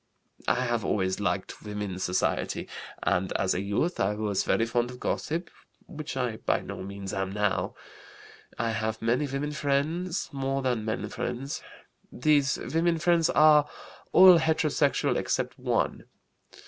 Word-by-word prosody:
"I 125 - +2
have 120 -3 0
always 95 -1 0
liked 95 -2 -2
women's 105 -3 -4
society 90 +1 -1 0.4
and, 95 +1 +1
as 95 - +1
a 90 - -1
youth, 105 - -1
I 100 +2 +1
was 105 -2 0
very 115 - +2
fond 120 +1 0
of 125 0 -10
gossip, 170 +3 -2 0.3
which 155 -6 -7
I 125 -4 -1
by - - 0
no - - -7
means 100 0 -6
am 95 -1 -2
now. 105 -1 -1 0.8
I 115 -1 0
have 110 0 -2
many 120 +6 +1
women 140 +2 -3
friends, 155 +5 -1
more 135 0 -1
than 120 -4 0
men 110 - -2
friends. 130 +4 -4 0.5
These 145 +1 +2 0.2
women 165 +1 +2
friends 170 0 +3
are 150 -1 +5 0.4
all 185 -2 +9
heterosexual 160 -3 +1
except - - -1
one. - - -1
125 Hz, 145 wpm, -28 LUFS, 105-150 Hz, 0.8 s, all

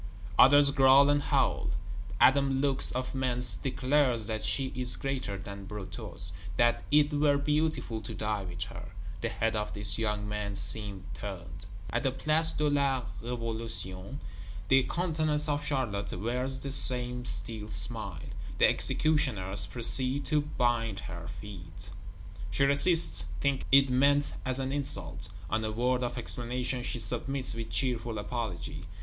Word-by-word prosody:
Others 145 +1 +8
growl 135 +1 +6
and 145 0 +2
howl. - - 0 0.5
Adam 135 0 +4
Lux, 135 -1 +1
of 130 0 -3
Mentz, 125 -2 0
declares 130 -3 +1
that 110 0 -4
she 130 +5 +1
is 125 -1 0
greater 130 -7 -3
than 100 +1 -9
Brutus; 95 -3 -7 0.3
that 120 0 +3
it 150 0 +3
were 145 -1 +3
beautiful 150 -6 -1
to 105 - -7
die 105 -1 -2
with 90 0 -5
her; 100 - -10 0.3
the - - -1
head 115 0 -1
of 105 0 -3
this 105 0 +4
young 105 -2 -1
man 105 -1 -4
seems 100 -2 +1
turned. 90 -3 -8 0.2
At - - 0
the 135 - +1
Place 155 +5 +3
de 150 - 0
la 140 -3 +1 0.2
Révolution, 115 -2 -5 0.5
the 135 0 +6
countenance 155 -4 -1
of 145 0 -1
Charlotte 120 -9 -2
wears 125 +5 -1
the 140 0 -5
same 125 -2 +2
still 110 -3 -2
smile. 100 -3 -2 0.4
The - - +6
executioners 105 -11 +2
proceed 130 +3 +1
to 150 -1 +1
bind 120 -7 -1
her 85 -2 -8
feet; 95 -2 -10 0.6
she 95 +9 0
resists, 160 +5 +5
thinking 140 -1 -1
it 135 -1 +6
meant 140 +3 +2
as 130 0 -2
an 135 0 -2
insult; 100 - -4 0.2
on 110 +4 -1
a 110 - -2
word 125 +3 0
of 120 0 -3
explanation, 125 +1 -3
she 120 -1 -4
submits 130 +2 -2
with 115 0 -6
cheerful 120 -4 -1
apology. 105 -3 -5
125 Hz, 145 wpm, -29 LUFS, 105-140 Hz, 0.6 s, Others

